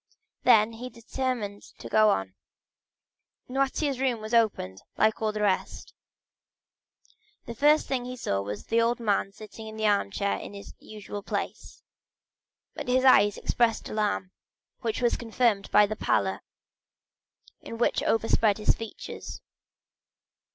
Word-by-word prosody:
Then 215 +1 +6
he 245 +3 -7
determined 230 -3 -4 0.2
to - - -9
go 215 0 +4
up. 95 - 0 1.2
Noirtier's 270 +1 -1
room 255 -3 0
was 215 +2 -7
opened, 205 - +1 0.2
like 220 +1 +2
all 215 -1 +1
the 210 0 -3
rest. 195 -2 -1 1.5
The 235 - -6
first 295 +6 +4
thing 255 -2 -2
he 250 0 -6
saw 100 - -1
was 100 +1 -6
the 230 +1 +2
old 235 +1 +1
man 205 -3 0
sitting 215 +2 -11
in 220 0 -9
his 220 - -1
armchair 200 -1 +1
in 205 - -9
his 200 - -10
usual 205 -1 -8
place, - - -5 0.9
but - - -7
his 255 +1 +2
eyes 205 -6 +6
expressed 230 -2 0
alarm, 205 -3 -1 0.5
which 230 +1 -3
was 240 - +3
confirmed 225 -3 0
by 210 - +6
the 215 +1 -4
pallor - - 0 1.2
which 230 +1 -1
overspread 225 -2 +2
his 210 - +2
features. 225 -1 -8
220 Hz, 135 wpm, -27 LUFS, 205-240 Hz, 1.5 s, Then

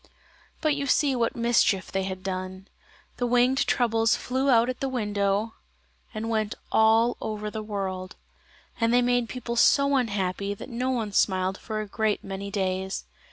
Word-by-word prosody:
But 310 -2 +2
you 280 -1 -2
see 275 0 +3
what 235 -2 0
mischief 230 -5 +2
they 195 - 0
had 185 -1 -5
done. 185 0 -5 0.5
The 245 - 0
winged 245 +2 +3
troubles 225 -2 +2
flew 260 +2 -1
out 235 -2 +5
at 255 - -3
the 270 - -1
window 205 -2 -1 0.6
and 215 +1 -4
went 220 -2 -1 0.2
all 225 +2 +4
over 210 -1 -4
the 220 - -4
world: 190 -3 -4 0.6
and 230 -1 +2
they 245 0 +4
made 245 -1 +1
people 245 -2 -4
so 280 +4 +4
unhappy 200 -5 -1
that 205 - -9
no 250 +1 -2
one 230 -5 -1
smiled 190 -1 +1
for 215 -2 -4
a 210 - -6
great 215 0 -1
many 195 +1 -5
days. 190 -1 -2
220 Hz, 165 wpm, -26 LUFS, 195-245 Hz, 0.6 s, out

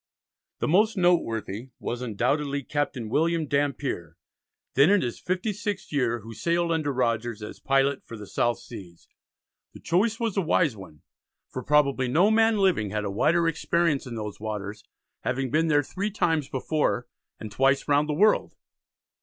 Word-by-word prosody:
The - - +1
most 210 +6 +3
noteworthy 125 - 0
was 120 +1 -4
undoubtedly 140 +5 -1
Captain 145 -5 -2
William 160 +6 +1
Dampier, 140 - -2 0.6
then 140 +6 +5
in 205 0 +4
his 120 -2 -4
fifty 185 +4 -2
sixth 205 -1 -4
year, 120 -5 0
who 115 +2 -10
sailed 170 +6 0
under 155 -3 0
Rogers 120 -3 -1
as 105 - -8
"Pilot 135 0 +1
for 115 - -9
the 105 - -9
South 120 +4 0
Seas." 95 -8 -12 0.7
The - - -10
choice 210 +6 +1
was 230 -4 -1
a - - +4
wise 160 -5 +2
one, 95 -7 -13 0.5
for 130 - -4
probably 140 -2 +2
no 170 - +4
man 225 0 +4
living 185 - +2
had 105 +1 -2
a 100 - -2
wider 165 +11 +2
experience 165 -3 0
in 120 - -6
those 105 -2 -6
waters, 105 -1 -5 0.4
having 130 0 -2
been 160 +2 +2
there 145 -2 +3
three 200 +8 -3
times 165 -8 0
before, 150 +3 -1 0.3
and 110 - -7
twice 135 +5 +2
round 145 +1 +2
the - - +1
world. 210 +6 +3
140 Hz, 165 wpm, -26 LUFS, 115-170 Hz, 0.7 s, then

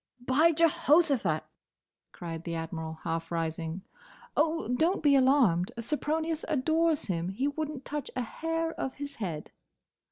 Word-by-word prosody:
"By 305 +7 +5
Jehoshaphat!" 300 - +3 0.7
cried 165 -1 -6
the 170 -1 -4
Admiral, 160 -1 -5
half 165 0 -3
rising. 165 +1 -3 0.5
"Oh, 320 +2 +1
don't 320 +10 +1
be 285 -2 +6
alarmed! 255 -10 +4
Sempronius 310 +5 -1
adores 315 +2 +2
him. 175 -2 -2
He 240 +9 -1
would 295 +1 -2
n't 275 -3 -8
touch 295 -2 -4
a 255 - 0
hair 325 +6 -2
of 265 - -4
his 285 0 -7
head." 170 -8 -4
265 Hz, 135 wpm, -29 LUFS, -, 0.7 s, be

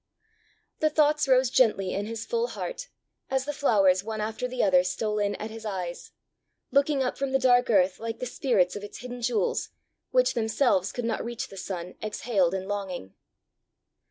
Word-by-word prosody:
The 310 - +3
thoughts 300 -1 +3
rose 255 -1 +4
gently 210 -8 +3
in 205 +2 -2
his 225 0 -5
full 470 0 0
heart, - - -5 0.4
as 265 0 0
the 295 - -3
flowers, 195 -10 +3
one 220 0 -4
after 220 +3 -2
the 250 0 -1
other, 185 -3 +5
stole 210 +3 -1
in 205 0 0
at 215 +1 -6
his 225 0 -9
eyes, 185 -5 -5 0.6
looking 280 0 +3
up 255 - -3
from 275 -1 -2
the - - +5
dark 245 -1 +4
earth 190 -4 +3
like 230 0 -4
the 250 - -4
spirits 235 -8 +1
of 205 - -6
its 205 - -8
hidden 245 0 -7
jewels, 255 - 0 0.4
which - - +3
themselves 220 -4 +1
could 245 - -4
not 230 -1 -1
reach 235 0 -5
the - - -11
sun, 180 -2 -5
exhaled 205 -4 0
in 190 0 -4
longing. 190 - -4
225 Hz, 185 wpm, -27 LUFS, 195-260 Hz, 0.6 s, other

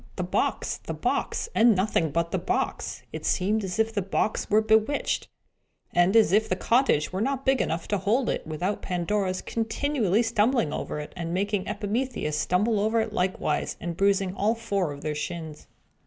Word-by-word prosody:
The - - -2
box, - - -1
the - - -6
box, - - -1
and 230 -1 +5
nothing 185 -4 +1
but 170 +3 -1
the 190 - 0
box! 175 - -2
It - - -5
seemed 205 +3 +1
as 190 +1 -3
if 225 0 +1
the 205 - 0
box 195 +3 -1
were 215 +1 +4
bewitched, 220 +6 +1 0.7
and 175 +4 +3
as 220 -6 +6
if 215 +3 +3
the 185 - +1
cottage 230 - +2
were 190 - -1
not 270 +2 -1
big 265 -1 +3
enough 165 +1 -2
to 205 - +1
hold 225 +7 +1
it, - - -2
without 175 +6 -2
Pandora's 185 +1 -1
continually 225 -2 0
stumbling 225 - +1
over - - -4
it, 150 - -7
and 170 -1 -3
making 200 0 -1
Epimetheus 210 - -2
stumble 200 +8 +1
over 220 +3 +2
it 220 -1 -2
likewise, 185 -2 -1
and 170 -1 -4
bruising 195 0 +2
all 210 +4 +1
four 200 -8 -1
of 140 0 -8
their 155 - -1
shins. 155 0 -6
200 Hz, 185 wpm, -26 LUFS, 180-225 Hz, 0.7 s, as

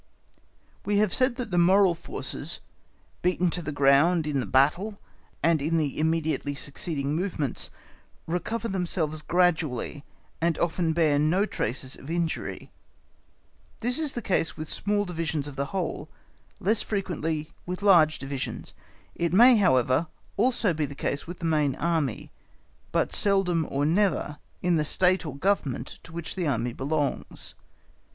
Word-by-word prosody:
We 205 0 +1
have 210 -3 +2
said 255 -1 +3
that 245 -5 -5
the 175 - +2
moral 185 +1 +5
forces, 170 - -4 0.6
beaten 180 -1 +1
to 175 - -3
the 155 -2 -4
ground 145 +4 +4
in 145 -2 0
the 125 - -2
battle 170 +11 +2 0.5
and 165 -2 +3
in 160 +3 +1
the 150 -3 -1
immediately 160 -2 0
succeeding 140 0 -2
movements, 160 -6 -2 0.6
recover 210 +8 -2
themselves 170 -5 -1
gradually, 155 -5 0 0.4
and 165 -1 +1
often 170 -1 0
bear 155 -3 +3
no 170 +7 +3
traces 130 - -3
of 135 - -11
injury; 170 -1 -3 1.1
this 245 +5 0
is 305 -3 0
the 240 - -4
case 165 -6 0
with 155 - -5
small 205 +3 0
divisions 160 -5 -2
of 145 - -8
the 140 +1 -1
whole, 170 -5 -3 0.5
less 215 +4 +1
frequently 165 -6 -2 0.2
with 180 +3 -4
large 170 -6 +6
divisions; 135 -1 -5 0.4
it 170 -1 -1
may, 240 +6 +7
however, 130 - +3 0.3
also 225 -3 +2
be 155 -2 -1
the 140 - -9
case 140 +2 -3
with 175 +1 -7
the 170 - -5
main 150 -4 +2
Army, 160 -7 -1 0.6
but - - +1
seldom 185 -5 +2
or 140 +1 0
never 165 -3 +1 0.2
in 175 -2 +3
the 155 - +2
State 180 +3 +2
or 140 - -6
Government 140 -8 -1
to - - -14
which 170 0 -5
the 180 -4 -1
Army 120 -3 -1
belongs. 145 +2 -2
165 Hz, 150 wpm, -27 LUFS, 145-185 Hz, 1.1 s, may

